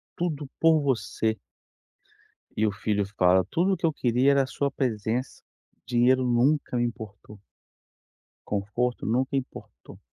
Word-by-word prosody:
tudo 150 -5 -3
por 160 -2 +4
você". 115 -4 -1 1.2
e 110 - +2
o 105 - +1
filho 100 0 -1
fala: 95 -2 +2
"Tudo 185 +4 +2
o - - -1
que 165 - -2
eu 160 - +2
queria 125 +2 +2
era 140 -1 +3
a - - -5
sua 140 0 -2
presença, 120 -1 -2 0.4
dinheiro 125 +2 +3
nunca 125 +2 +1
me 120 - +1
importou". 105 -3 -8 1.1
conforto 105 +5 -2
nunca 130 +4 0
importou 130 - -9
125 Hz, 135 wpm, -26 LUFS, 110-140 Hz, 1.2 s, por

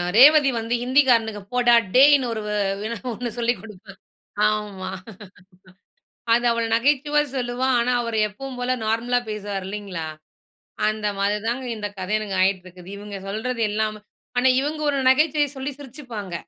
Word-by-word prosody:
ரேவதி 290 +3 +8
வந்து 230 +1 -2
ஹிந்திகாரனுக்கு 245 -5 +3
போடா 240 -1 +5 0.2
டேய்ன்னு 275 0 +6
ஒரு 220 - -4
வ - - -3 0.4
என்ன 235 - -4 0.2
ஒண்ணு 240 +2 -4
சொல்லிக் 235 -3 0
கொடுப்பா", 200 -2 -12 0.5
ஆமா. 210 -3 -3 1.5
அது 240 - +1
அவள் 230 0 0
நகைச்சுவையா 290 +4 +2
சொல்லுவா, 245 0 -1
ஆனா, 245 +2 +1
அவரு 230 -2 -2
எப்பவும் 260 +5 -8
போல 255 +1 0
நார்மலா 235 +3 +1
பேசுவார் 205 -2 -4
இல்லைங்களா, 195 -5 -5 0.8
அந்த 215 -1 -1
மாரி 200 +1 +1
தாங்க 250 +3 -2
இந்த 205 -1 -4
கத 185 +1 -5
எனக்கு 200 -3 -4
ஆயிட்ருக்குது. 185 -1 -2
இவுங்க 205 -1 -8
சொல்றது 230 +4 -3
எல்லாமே 215 0 -1 0.4
ஆனா 260 +1 +4
இவுங்க 305 +2 -3
ஒரு 285 - 0
நகைச்சுவைய 290 +2 +3
சொல்லி 265 +2 -3
சிரிச்சுப்பாங்க, 245 - -8
230 Hz, 140 wpm, -23 LUFS, 210-260 Hz, 1.5 s, ரேவதி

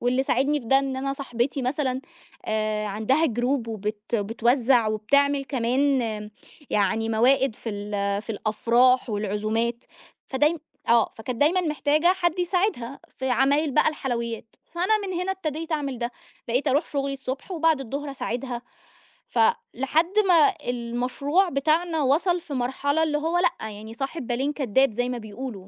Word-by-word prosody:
واللي 250 +2 +1
ساعدني 275 +3 +1
في 235 - -13
ده 270 +4 +5
إن 270 -1 -2
أنا 275 +1 -2
صاحبتي 270 0 -2
مثلًا، 260 0 -1 0.4
آآ 215 -1 -1
عندها 220 +10 +1
Group 245 -1 -1
وبت 215 +1 -4
بتوزع 235 +3 +2
وبتعمل 280 +6 +2
كمان 265 +1 +1 0.7
يعني 215 +2 +1
موائد 245 +2 +3
في 230 - -7
ال 205 -1 -2
في 225 - -8
الأفراح 235 +4 +2
والعزومات، 215 +3 -1 0.4
فدايمً 300 +5 +2 0.3
آه، 230 -1 +5
فكانت 230 +2 -6
دايمًا 335 +6 +4
محتاجة 305 0 +1
حد 360 -1 +2
يساعدها، 355 - -1 0.2
في 260 -1 -1
عمايل 280 +4 +3
بقى 290 - +3
الحلويّات، 235 -6 -4 0.2
فأنا 380 +5 +2
من 375 - -4
هنا 375 +1 -1
ابتديت 325 -3 -4
أعمل 280 -5 -2
ده، 240 0 -2 0.4
بقيت 255 +5 +1
أروح 285 +5 +2
شُغلي 275 -1 -2
الصبح 270 +4 -6
وبعد 325 -4 +2
الضُّهر 280 +3 -4
أساعِدها، 245 -2 -4 0.6
ف 235 - -3 0.3
لحد 315 +8 +1
ما 335 -5 +5 0.2
المشروع 250 +9 0
بتاعنا 315 +3 +1
وصل 345 +6 +2
في 325 -4 -8
مرحلة 275 +4 0
اللي 300 -2 +1
هو 325 +3 0
لأ، 350 -11 0
يعني 215 +2 -9
صاحب 270 +2 -5
بالين 265 +4 -1
كدّاب 265 -2 +2
زي 245 +3 -1
ما 250 - -2
بيقولوا، 215 -2 -7
265 Hz, 150 wpm, -25 LUFS, 230-295 Hz, 0.7 s, ده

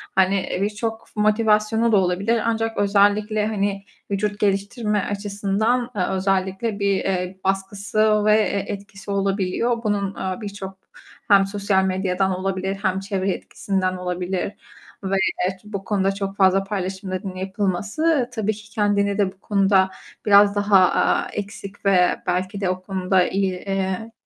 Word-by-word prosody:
hani, 190 +1 +4
eee, 180 - -3
birçok 220 +2 -3
motivasyonu 215 +1 +2
da 210 - +5
olabilir 195 +5 +1
ancak 225 0 -1
özellikle 205 +1 +2
hani 200 -2 -1 0.3
vücut 205 +1 -1
geliştirme 205 +2 0
açısından, 205 +4 0
eee, 185 - +1
özellikle 190 +3 -1
bir, 200 -1 +2
eee, 185 -1 -2
baskısı 205 +2 +1
ve, 215 - +5
eee, 200 -2 0
etkisi 200 0 -7
olabiliyor. 200 +4 0
Bunun, 205 -2 0
eee, 190 +3 -4
birçok 200 -2 -7 0.5
hem 200 -1 +6
sosyal 200 -1 +1
medyadan 190 0 0
olabilir 190 0 -2
hem 190 -1 +1
çevre 195 -1 -1
etkisinden 185 -1 -2
olabilir 180 +2 -3 0.5
ve 195 0 0 0.3
evet 185 0 -2
bu 205 -2 -6
konuda 195 -1 +1
çok 195 0 -4
fazla 195 0 +4
paylaşımların 190 -1 -4
yapılması 205 - 0
tabii 220 -2 0
ki 215 +1 -13
kendini 205 -2 +1
de 200 -2 +1
bu 190 - -25
konuda 195 -2 +3 0.4
biraz 200 0 +6
daha, 205 0 +2 0.2
aaa, - - +2
eksik 200 0 -7
ve 185 -2 +3
belki 185 +3 -1
de 190 - +1
o 185 0 -2
konuda 185 -1 +1
iyi, 195 -1 0
eee, 195 +3 -3
200 Hz, 140 wpm, -22 LUFS, 190-210 Hz, 0.5 s, hem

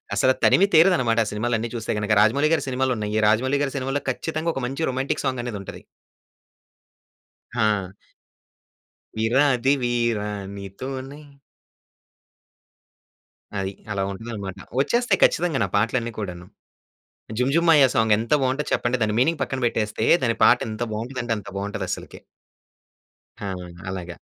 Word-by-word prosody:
అసలు 130 +6 +4
తనివి 195 - +5
తీరదనమాట 155 -9 +4
ఆ - - -4
సినిమాలన్నీ 115 +2 -1
చూస్తే 115 -2 -3
గనుక. 105 +1 -2
రాజమౌళి 140 +8 +3
గారి 150 -3 +1
సినిమాలు 130 0 0
ఉన్నాయి, 105 0 -1
రాజమౌళి 130 +6 +2
గారి 135 -1 -2
సినిమాలో 135 +2 -2
ఖచ్చితంగా 160 +5 -2
ఒక - - -2
మంచి 135 +5 -2
రొమాంటిక్ 130 +3 -2
సాంగ్ 130 -2 -1
అనేది 115 -5 -4
ఉంటది. - - -9 1.7
హా! 105 -5 0 1.2
విరాది 130 +3 +3
వీరా! 120 -3 0 0.3
నీతోనే 130 +9 -7 2.4
అది. 95 0 -3 0.2
అలా 100 -1 -1
ఉంటదన్నమాట. 100 -2 -6 0.2
వచ్చేస్తాయి 235 - +1
ఖచ్చితంగా 165 -5 +2
ఆ - - -15
పాటలన్నీ 115 +2 0
కూడాను. 90 -4 -6 0.9
'జుమ్ 125 +2 +1
జుమ్ 170 +1 +3
మాయ 150 -4 +7
సాంగ్' 110 -1 +4
ఎంత 115 +5 -1
బావుంటది 130 +3 -1
చెప్పండి. 120 0 0
దాని 105 -1 0
మీనింగ్ 155 +3 +1
పక్కన 135 -1 -2
పెట్టేస్తే 110 -1 -1 0.2
దాని 115 -2 +1
పాట - - +7
ఎంత 110 +2 -3
బావుంటది 120 +4 -4
అంటే 115 - -1
అంత 105 - -10
బావుంటదస్సలకి. 100 +1 -5 1.2
ఆ! 100 -2 -3 0.4
అలాగ. 90 -2 -6
120 Hz, 130 wpm, -23 LUFS, 105-135 Hz, 2.4 s, మాయ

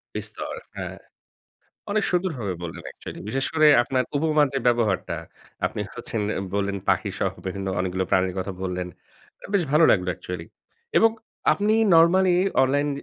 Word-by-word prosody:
বিস্তর, - - -3 0.2
হ্যাঁ। - - -5 0.9
অনেক 215 0 +1
সুন্দরভাবে 155 - -1
বললেন 85 -1 -7
actually - - -9
বিশেষ 135 +3 -1
করে 155 -1 +5 0.2
আপনার 130 0 0
উপমার 150 -1 +3
যে 135 - 0
ব্যবহারটা 115 -5 +1 0.5
আপনি - - -2
হচ্ছেন, 110 - -4 0.3
বললেন 100 0 0
পাখি - - +2
সহ - - +1
বিভিন্ন 95 +1 -4
অনেকগুলো 95 0 -1
প্রাণীর 95 0 +1
কথা 95 +1 -4
বললেন। 90 -1 -3 0.7
বেশ 195 - +3
ভালো 155 +2 +5
লাগলো 90 -2 +2
অ্যাকচুয়ালি। 90 -1 -7 0.5
এবং 225 - +6 0.4
আপনি 210 +1 +1 0.2
নরমালি 175 +2 +5 0.3
অনলাইন 145 +2 +1
120 Hz, 140 wpm, -24 LUFS, -, 0.9 s, এবং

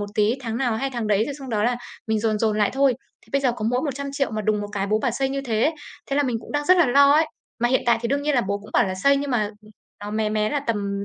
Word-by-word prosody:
một 205 - -3
tí 215 +2 +2
tháng 230 -2 -4
nào 240 -4 0
hay 270 +3 -2
tháng 235 -3 -3
đấy, 210 +1 +2
rồi 285 - -4
xong 270 -2 -9
đó 215 -1 0
là 245 0 +1 0.3
mình 220 -1 +1
dồn 215 -1 0
dồn 215 -1 +1
lại 205 - +3
thôi. 270 -2 +3 0.3
Thì - - -23
bây 275 - +2
giờ 250 -3 +2
có 215 - -4
mỗi 250 +1 +1
100.000.000 280 -2 -2
mà 215 -1 -3
đùng 210 0 +1
một - - -4
cái 200 -1 -1
bố 215 +2 +1
bảo 240 +2 0
xây 265 +3 -1
như 275 0 -2
thế, 235 +5 +1 0.4
thế 275 - 0
là 290 - +3
mình 245 -3 -1
cũng - - -11
đang 290 0 0
rất 370 0 +6
là 340 - +5
lo 280 +3 +6
ấy! 315 +2 +4 0.3
Mà 240 - +3
hiện 260 - +2
tại 235 -1 +4
thì 235 - -1
đương 285 +1 0
nhiên 295 -1 +1
là 245 - +4
bố 200 0 -2
cũng 210 - -14
bảo - - +3
là 185 - -3
xây 280 +9 +3
nhưng 280 0 -2
mà, 240 -4 +2 0.2
ừm, 215 - -17 0.3
nó 205 - -5
mé 215 0 0
mé 215 0 0
là 290 - 0
tầm 200 -3 -2
235 Hz, 325 wpm, -23 LUFS, 215-275 Hz, 0.4 s, rất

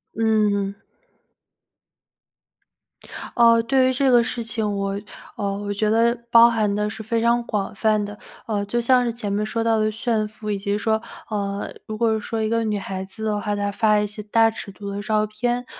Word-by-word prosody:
嗯。 210 -3 +1 2.6
呃， 230 -1 +6
对 260 +2 +3
于 - - 0
这 270 +1 +2
个 240 -1 +6
事 235 +1 -3
情， 220 -3 -2
我 195 0 -2 0.4
呃， 200 -1 -2
我 205 0 -3
觉 210 +1 0
得 230 +2 +3
包 235 0 +8
含 215 -3 +1
的 210 +1 0
是 220 +1 -7
非 230 +1 -1
常 235 +1 +2
广 210 -1 -3
泛 215 0 +2
的， 205 0 -8 0.3
呃， 210 -3 -1
就 240 +4 -1
像 250 +1 +4
是 235 -1 -1
前 215 -3 -4
面 210 +1 0
说 225 +1 -2
到 225 -1 +2
的 215 0 +1
炫 220 0 -1
富， 215 0 -8
以 205 - 0
及 200 +1 -1
说， 220 +1 0 0.3
呃， 200 -2 -3
如 215 - -6
果 225 -1 +2
说 220 +1 -3
一 220 - 0
个 230 +1 +1
女 210 -2 -1
孩 190 -1 -5
子 195 +3 -9
的 210 -1 -1
话， 205 -1 -1
她 205 0 -1
发 215 0 +3
一 210 - 0
些 210 +1 -9
大 225 +2 +3
尺 215 -2 -8
度 200 +1 -8
的 200 +1 -4
照 215 0 +1
片。 240 +3 -2
215 Hz, 215 characters per minute, -22 LUFS, 205-230 Hz, 2.6 s, 包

